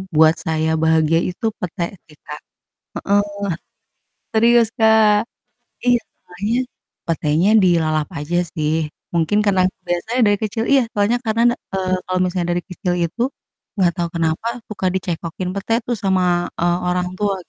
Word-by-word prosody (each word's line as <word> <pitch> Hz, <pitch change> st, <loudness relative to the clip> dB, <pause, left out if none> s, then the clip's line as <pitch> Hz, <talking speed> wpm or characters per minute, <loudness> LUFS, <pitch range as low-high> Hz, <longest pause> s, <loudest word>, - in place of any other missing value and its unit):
buat 160 Hz, +1 st, +6 dB
saya 160 Hz, 0 st, -1 dB
bahagia 160 Hz, 0 st, +3 dB
itu 180 Hz, +5 st, -5 dB
pete 175 Hz, -1 st, -3 dB, 0.2 s
sih 150 Hz, -, -18 dB
Kak. -, -, -8 dB, 0.6 s
Heeh. 205 Hz, +1 st, +3 dB, 1.1 s
Serius 235 Hz, +1 st, +5 dB
Kak. 220 Hz, -1 st, +4 dB, 0.6 s
Iya 245 Hz, -1 st, +4 dB, 0.2 s
makannya, 205 Hz, +6 st, -3 dB, 0.5 s
petenya 160 Hz, +3 st, +2 dB
dilalap 155 Hz, -4 st, +2 dB
aja 165 Hz, +4 st, -2 dB, 0.2 s
sih. 155 Hz, 0 st, 0 dB, 0.4 s
Mungkin 170 Hz, +4 st, +1 dB
karena 190 Hz, -2 st, +3 dB
kebiasa 175 Hz, -1 st, -4 dB
aja 255 Hz, -, +3 dB
dari 205 Hz, 0 st, +3 dB
kecil 225 Hz, +1 st, -2 dB
iya 275 Hz, -1 st, +6 dB
soalnya 205 Hz, +4 st, +2 dB
karena 225 Hz, +1 st, +1 dB
na -, -, -2 dB, 0.2 s
eee 185 Hz, -1 st, -1 dB
kalau 185 Hz, 0 st, 0 dB
misalnya 180 Hz, -1 st, -1 dB
dari 175 Hz, -, -2 dB
kecil 180 Hz, 0 st, -2 dB
itu, 170 Hz, +8 st, -3 dB, 0.5 s
enggak 185 Hz, -4 st, +3 dB
tau 170 Hz, -, +1 dB
kenapa 165 Hz, +5 st, 0 dB, 0.2 s
suka 195 Hz, -2 st, -4 dB
dicekokin 180 Hz, 0 st, -3 dB
pete 205 Hz, +3 st, -2 dB
tuh 240 Hz, -, 0 dB
sama, 190 Hz, -1 st, +2 dB, 0.4 s
eee, 175 Hz, +1 st, +2 dB
orang 180 Hz, 0 st, 0 dB
tua. 205 Hz, -1 st, +1 dB
180 Hz, 150 wpm, -20 LUFS, 165-210 Hz, 1.1 s, buat